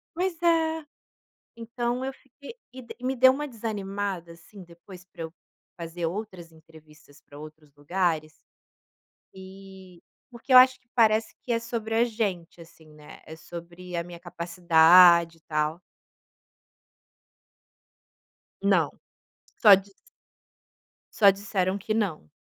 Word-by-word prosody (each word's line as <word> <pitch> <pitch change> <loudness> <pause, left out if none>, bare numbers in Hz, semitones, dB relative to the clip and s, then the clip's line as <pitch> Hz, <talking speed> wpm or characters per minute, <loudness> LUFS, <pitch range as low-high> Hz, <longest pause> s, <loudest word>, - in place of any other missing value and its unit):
Pois 355 -1 -3
é. 320 -2 +1 0.7
Então, 240 +2 -4
eu 270 - -4
fiquei 270 - -15 0.2
e 260 0 -10
de 235 - -12
me 260 +1 -1
deu 260 +1 +6
uma 295 +3 -4
desanimada, 200 - -5
assim, 185 +4 -15
depois 175 +2 -15
pra 170 -2 -11
eu 160 0 -7 0.5
fazer 170 0 -5
outras 185 -2 -7
entrevistas 155 -2 -20
pra 145 - -16
outros 155 -1 -14
lugares 155 0 -2 1.0
e, 190 -1 -14 0.3
porque 245 +2 -4
eu - - +10
acho 255 0 +6
que 250 - -40
parece 220 -1 +2
que 245 - -5
é 230 - +1
sobre 225 -1 -5
a 230 - +4
gente 195 -8 -4
assim, 165 -1 -18
né, 150 0 -15
é 160 - -10
sobre 175 +2 -10
a 170 - -2
minha 175 0 -11
capacidade, 170 0 +4
e - - -29
tal. 155 +2 -3 2.8
Não, - - +2 0.7
só 210 -3 +9
dis 195 +1 -4 1.2
só 200 -3 +6
disseram 195 -1 -2
que 215 +2 -4
não. 185 - -3
190 Hz, 130 wpm, -25 LUFS, 170-230 Hz, 2.8 s, eu